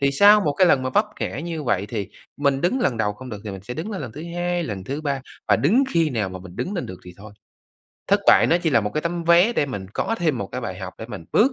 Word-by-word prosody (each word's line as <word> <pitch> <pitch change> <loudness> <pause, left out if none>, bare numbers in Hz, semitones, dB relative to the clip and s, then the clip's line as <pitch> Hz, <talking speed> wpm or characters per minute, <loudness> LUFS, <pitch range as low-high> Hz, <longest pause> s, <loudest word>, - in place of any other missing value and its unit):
Thì 140 0 +3
sau 205 +7 +7
một 150 -7 +1
cái 185 +6 +4
lần 135 -6 +4
mà 130 - -2
vấp - - +3
ngã - - -3
như 165 -1 -4
vậy, 105 -6 0
thì 105 -2 -4 0.3
mình 140 -2 +1
đứng 220 - +1
lần 130 - +1
đầu 105 -2 0
không 130 +5 -11
được 105 -2 -6
thì 105 - -4
mình 95 -1 -8
sẽ 125 +4 -6
đứng 170 - -5
lên 200 - -4
lần 120 -5 -7
thứ 150 - -8
2, 175 0 0
lần 100 -8 -5
thứ 140 +8 -4
3 140 -3 -2 0.3
và - - +5
đứng 220 - +3
khi 165 -2 +2
nào 110 -6 -1
mà 95 0 -7
mình 90 -1 -12
đứng 195 - -3
lên 175 - -3
được 95 - -8
thì 90 0 -11
thôi. 105 +1 -12 0.8
Thất - - +4
bại - - +7
nó 170 - +4
chỉ 170 -2 0
là 120 -5 +4
một 105 0 -2
cái 155 - +1
tấm 170 0 -2
vé 170 +7 +5
để 150 - +1
mình 100 -8 -5
có 225 - 0
thêm 155 -7 +1
một 100 - -3
cái 125 - -3
bài 95 -6 -5
học 95 -1 -6
để 110 - -7
mình 105 -8 -8
bước 255 +6 +4
140 Hz, 305 wpm, -23 LUFS, 105-170 Hz, 0.8 s, sau